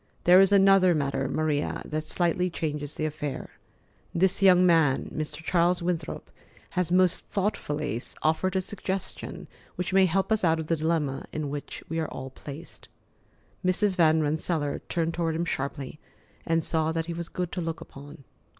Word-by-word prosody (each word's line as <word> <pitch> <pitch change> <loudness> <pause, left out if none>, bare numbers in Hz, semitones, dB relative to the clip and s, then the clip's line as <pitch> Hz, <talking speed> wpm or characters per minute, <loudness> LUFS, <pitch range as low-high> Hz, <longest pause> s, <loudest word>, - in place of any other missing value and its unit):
There 180 +2 +7
is 195 0 +4
another 195 -2 +5
matter, 140 -2 -1
Maria, 150 -1 -1
that 155 0 -3
slightly 180 +1 +1
changes 150 -3 -3
the 155 - -2
affair. 150 -2 -4 0.6
This 185 +3 +4
young 185 -2 +6
man, 160 -6 +3
Mr. 155 +1 -4
Charles 175 +1 +2
Winthrop, 170 -2 -3 0.4
has 180 -3 -1
most 185 -1 +3
thoughtfully 150 - -2 0.2
offered 160 +4 +1
a 190 - +1
suggestion 190 0 -4 0.3
which 180 +1 -3
may 190 -1 +6
help 190 +5 0
us 220 -2 +2
out 165 -2 +3
of 160 - -3
the 165 - +1
dilemma 155 -3 -1
in 150 -2 -3
which 145 0 -6
we 165 +1 -2
are 160 - -1
all 130 0 -7
placed." 145 +4 -10 0.8
Mrs. 185 +2 +2
Van 160 -3 +4
Rensselaer 150 0 -1
turned 165 -1 -1
toward 165 -2 -1
him 170 +1 -1
sharply, 140 -1 -4 0.5
and 165 0 +2
saw 160 0 0
that 165 0 -2
he 170 - -4
was 170 0 -5
good 180 -2 -3
to 180 - -3
look 165 -1 -3
upon. 145 +2 -12
165 Hz, 170 wpm, -27 LUFS, 150-180 Hz, 0.8 s, There